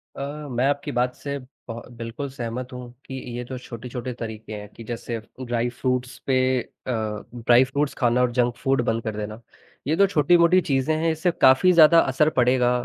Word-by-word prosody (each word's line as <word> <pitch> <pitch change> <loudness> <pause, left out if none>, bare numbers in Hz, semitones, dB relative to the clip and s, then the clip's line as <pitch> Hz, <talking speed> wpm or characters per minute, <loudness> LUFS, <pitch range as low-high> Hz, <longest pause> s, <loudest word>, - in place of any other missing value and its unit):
अ, 145 +2 -6
मैं 125 +1 +1
आपकी 145 +1 -1
बात 125 -1 0
से 140 0 -5 0.3
ब 115 +1 -5 0.2
बिल्कुल 115 +5 -5
सहमत 125 +1 -5
हूँ 125 -1 -8
कि - - -9 0.2
ये 125 - -3
जो 130 0 -6
छोटे-छोटे 125 +1 -6
तरीके 110 -1 -6
हैं 105 -1 -7
कि 115 - -11
जैसे 115 +1 -5
अब 115 +3 -9
ड्राइ 120 0 0
फ्रूट्स 125 0 -2
पे 130 -1 +3 0.2
अ, 130 - -9 0.4
ड्राइ 120 +1 +5
फ्रूट्स 140 +2 -1
खाना 120 0 +2
और 125 -1 +2
जंक 120 0 +1
फूड 135 0 +1
बंद 115 0 0
कर 110 -1 -4
देना, 105 +2 -6 0.5
ये 155 - +2
जो 200 +2 +5
छोटी-मोटी 170 +2 +4
चीज़ें 140 +1 0
हैं, 165 0 +1
इससे 160 +3 0
काफ़ी 130 +8 +6
ज़्यादा 165 0 +7
असर 150 +3 +3
पड़ेगा 125 0 +3
125 Hz, 190 wpm, -24 LUFS, 120-145 Hz, 0.5 s, ज़्यादा